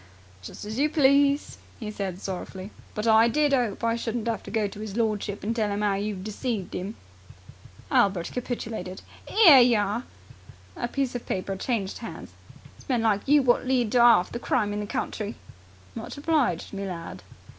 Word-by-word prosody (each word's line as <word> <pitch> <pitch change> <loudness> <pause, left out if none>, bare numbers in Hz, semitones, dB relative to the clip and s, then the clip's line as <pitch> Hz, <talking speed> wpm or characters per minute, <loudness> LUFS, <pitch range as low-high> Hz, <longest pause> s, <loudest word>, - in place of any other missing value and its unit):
"Just 90 - -9
as 215 +4 -4
you 300 +2 +3
please," 280 -1 +3 0.2
he 215 -3 -5
said 190 -3 -4
sorrowfully. 190 +1 -6 0.2
"But 210 - -2
I 225 0 +6
did 295 +3 +2
'ope 240 -5 0
I 230 0 +2
shouldn't 235 0 -3
'ave 230 -2 -1
to - - -8
go 220 -2 0
to 205 +1 -9
'is 215 -1 -6
lordship 210 -3 -1
and 225 +3 -1
tell 215 -3 0
'im 205 +1 -2
'ow 205 -1 +2
you've 200 -1 -3
deceived 215 -1 -4
him." 195 +5 -4 1.0
Albert 190 -4 +2
capitulated. 225 -6 -5 0.3
"'Ere 335 - +8
yer 240 -2 +5
are!" 205 +4 -1 0.7
A 240 - -3
piece 270 0 -2
of 245 - -6
paper 190 +1 -2
changed 200 -1 -2
hands. 230 - -8 0.5
"It's - - -18
men 245 -3 +1
like 210 0 +1
you 290 0 +5
wot 250 0 +2
lead 245 -4 +1
to 250 - +3
'arf 235 -6 +6
the 235 - -4
crime 210 -4 0
in 205 - -2
the 205 - -4
country!" 210 0 -3 0.6
"Much - - -7
obliged, 285 - 0
me 195 0 -4
lad." 165 - -7
220 Hz, 185 wpm, -26 LUFS, 200-245 Hz, 1.0 s, Ere